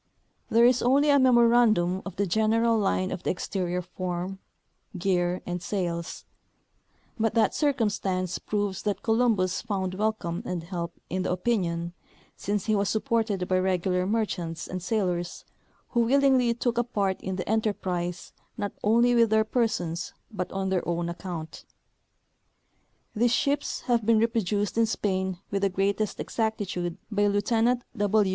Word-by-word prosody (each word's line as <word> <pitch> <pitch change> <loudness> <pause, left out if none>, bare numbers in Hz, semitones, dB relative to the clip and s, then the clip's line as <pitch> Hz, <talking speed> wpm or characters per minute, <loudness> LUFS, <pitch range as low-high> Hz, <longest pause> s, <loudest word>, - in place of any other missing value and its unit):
There 230 +1 +5
is 250 0 +4
only 280 +4 +4
a 280 - +5
memorandum 235 -7 +4
of 195 - -7
the 200 - 0
general 220 +4 +2
line 195 -3 +1
of 185 - -4
the - - -2
exterior 180 -1 -2
form, 180 +1 -4 0.6
gear 180 -1 0
and 175 0 -3
sails; 175 -4 -3 0.9
but 225 +1 +1
that 220 -3 +3
cir 295 -2 +2
cumstance 195 -7 -1
proves 205 -3 -2
that 205 -2 -2
Columbus 220 -5 +2
found 190 -4 -2
welcome 195 -4 -1
and 175 -2 -4
help 170 -1 -5
in 185 +1 -1
the 185 - -1
opinion, 175 -4 -1 0.4
since 205 -1 -2
he 215 - +2
was 200 -1 +1
supported 220 -5 0
by 185 0 +2
regular 185 0 0
merchants 180 -6 -2
and 185 0 -5
sailors, 180 -3 -2 0.4
who 240 - 0
willingly 260 0 +4
took 240 0 0
a - - +3
part 200 -5 -1
in 190 0 -3
the 185 - -4
enterprise 190 -5 -2 0.2
not 205 0 -2
only 235 +3 +4
with 230 -2 +4
their 220 0 +4
persons, 180 -8 -1 0.2
but 185 -4 -4
on 190 0 -2
their 185 -2 +1
OAvn 170 0 -2
account. 170 -2 -7 1.5
These 235 +2 +3
ships 285 +2 0
have 240 -3 +1
been 225 +1 +4
reproduced 215 -2 0
in 225 - +4
Spain 190 -3 -1 0.2
Avith 200 - 0
the 200 - +2
greatest 200 +2 -1
exactitude 195 -6 -2
by 205 0 +2
Lieutenant 225 +4 +1
W. 205 -1 +2
200 Hz, 150 wpm, -27 LUFS, 180-225 Hz, 1.5 s, There